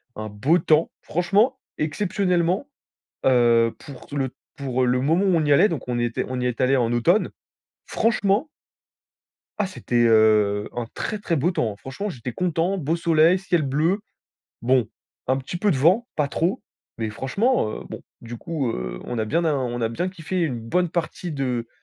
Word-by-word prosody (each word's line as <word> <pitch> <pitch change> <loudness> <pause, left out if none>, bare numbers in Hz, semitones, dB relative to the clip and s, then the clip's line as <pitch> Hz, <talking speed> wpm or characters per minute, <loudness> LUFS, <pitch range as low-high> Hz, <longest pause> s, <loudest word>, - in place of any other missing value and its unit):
un 110 0 -5
beau 130 - +2
temps. 155 -1 +2
Franchement, 205 - +1 0.2
exceptionnellement, 180 - 0 0.6
heu, 120 -3 +4
pour 135 -3 -12
tout 145 - -8
le 135 -2 -1 0.3
pour, 130 -2 -1
heu, - - +3
le 125 +1 +2
moment 165 +8 +2
où 190 - +3
on 160 -2 +2
y 145 - +1
allait, 205 +9 +5
donc 160 -6 -4
on 125 -1 -1
était 120 -1 -1
on 130 0 -3
y 125 - -1
est 120 -2 -3
allé 130 +1 +3
en 120 -2 +1
automne. 170 - +2 0.5
Franchement 220 +3 +1 1.1
ah 200 - 0
c'était, 120 -10 0
heu, 105 -2 +3
un 120 -1 -3
très, 215 - -3
très 175 -4 -1
beau 160 +5 +1
temps! 110 - -1
Franchement, 135 - -6
j'étais 125 - -6
content, 175 +5 0
beau 160 -1 0
soleil, 165 +1 +4
ciel 180 -3 0
bleu. 155 +8 +1 0.6
Bon, 125 -2 +2 0.4
un 130 - +3
petit 135 +6 -5
peu 205 +4 +1
de 160 - +1
vent, 185 - +3
pas 150 - +2
trop, 165 +6 -1 0.4
mais 110 -2 -2
franchement, 135 - 0
heu. - - -10
Bon, - - -8 0.2
du 120 0 -8
coup, 145 -2 -3
heu, - - -5
on 120 - -4
a 110 - 0
bien 165 +10 0
av 155 -3 +2
on 120 -2 -2
a 115 - +1
bien 170 +11 -2
kiffé 185 0 -4
une 145 -8 -1
bonne 175 +11 0
partie 170 +1 -3
de 125 -5 -2
145 Hz, 190 wpm, -23 LUFS, 120-180 Hz, 1.1 s, allait